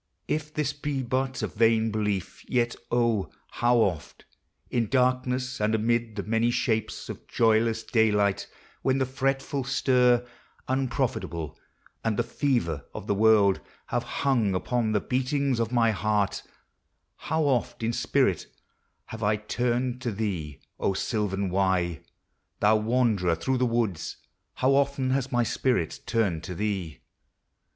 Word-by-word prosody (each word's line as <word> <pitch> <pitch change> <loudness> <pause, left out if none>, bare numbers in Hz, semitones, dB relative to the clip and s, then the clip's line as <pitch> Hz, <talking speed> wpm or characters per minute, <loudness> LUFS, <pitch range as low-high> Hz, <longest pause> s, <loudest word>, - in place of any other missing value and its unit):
If 150 0 -2
this 150 -2 -1
Be 145 -2 -3
but 130 +1 -1
a - - +1
vain 115 0 +2
belief, 105 -3 -2
vet, 120 -2 +1 0.2
0, 115 -4 +1 0.2
how 120 0 +2
oft— 90 -9 -1 0.5
In 115 -3 +1
darkness 130 0 +1
and 110 +1 +2
amid 115 0 0
the 100 - -3
many 115 +3 +1
shapes 110 -2 -1
Of - - -8
joyless 115 0 +2
daylight; 105 -3 +2 0.3
when 130 0 +2
the 135 - +1
fretful 135 +1 -1
stir 125 -2 +3 0.4
Unprofitable, 125 - -2 0.5
and 110 -2 0
the - - +2
fever 115 - -1
of - - -6
the 105 - +1
world, 105 -2 +4 0.3
Have 120 - 0 0.2
hung 115 -8 +2
upon 115 +3 0
the 105 - +3
beatings 130 0 0
of 115 0 0
my 115 -2 +3
heart 105 +1 0 0.8
How 160 +1 -1
oft, 130 -5 0
in 115 +1 0
spirit, - - +1 0.6
have 110 - -8
I 105 0 +2
turned 125 +3 -1
to 120 - -2
thee, 90 -10 -3 0.2
O 95 - 0
sylvan 100 -3 -1
Wye! 90 -3 +1 0.6
thou 105 +1 +4
wanderer 110 -6 +2
through 130 +10 -1
the 125 - +3
woods, 115 -7 -1 0.4
How 130 +1 +2
often 140 -1 +1
has 135 0 0
my 120 -1 +2
spirit 120 - 0
turned 95 -8 0
to 90 - -5
thee! 95 -5 -3
115 Hz, 140 wpm, -27 LUFS, 105-130 Hz, 0.8 s, world